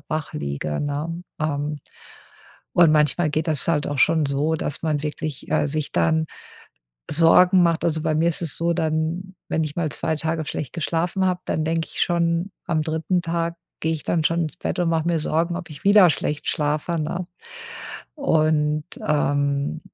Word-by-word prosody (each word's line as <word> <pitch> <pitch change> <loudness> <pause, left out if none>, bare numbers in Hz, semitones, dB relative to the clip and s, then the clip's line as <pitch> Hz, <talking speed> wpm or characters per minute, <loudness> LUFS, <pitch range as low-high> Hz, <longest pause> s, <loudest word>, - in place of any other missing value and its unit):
wach 155 -1 -3
liege, 70 +1 -3
ne? 150 +4 -3 0.2
Ähm, 150 -1 -1 1.0
und 170 -3 +6
manchmal 150 +1 +2
geht 155 +2 -1
das 150 -4 +1
halt 150 -3 +1
auch 145 -2 -3
schon 160 +1 +4
so, 145 +3 0
dass 145 -2 -2
man 155 -3 0
wirklich, 150 -1 -5
äh, - - +2
sich 155 0 -3
dann 160 -1 +2 0.8
Sorgen 180 +3 +6
macht, 170 -1 +2
also 160 -2 +1
bei 160 -1 +1
mir 165 +2 +3
ist 160 - -1
es 160 - -3
so, 170 +1 +1
dann, 165 +3 -1
wenn 160 - 0
ich 150 -1 -6
mal 160 -4 0
2 160 +2 -1
Tage 160 +1 -2
schlecht 145 - -4
geschlafen 175 +3 0
habe, 180 -1 0
dann 155 - 0
denke 165 0 0
ich - - -5
schon 170 +1 +1 0.2
am 165 -4 +1
3. 160 +3 0
Tag 170 0 -2 0.2
gehe 160 +1 0
ich 155 - -5
dann 160 -2 0
schon 170 +2 +2
ins 155 +2 -4
Bett - - -3
und 175 - +2
mache 165 0 0
mir 170 -2 +1
Sorgen, 165 +3 0
ob 180 -1 -6
ich 150 +3 -11
wieder 200 -2 +7
schlecht 150 0 -2
schlafe, 155 +2 0
ne? 175 +4 -3 0.9
Und, 155 - +1 0.2
ähm 145 +1 +1
160 Hz, 180 wpm, -23 LUFS, 150-170 Hz, 1.0 s, wieder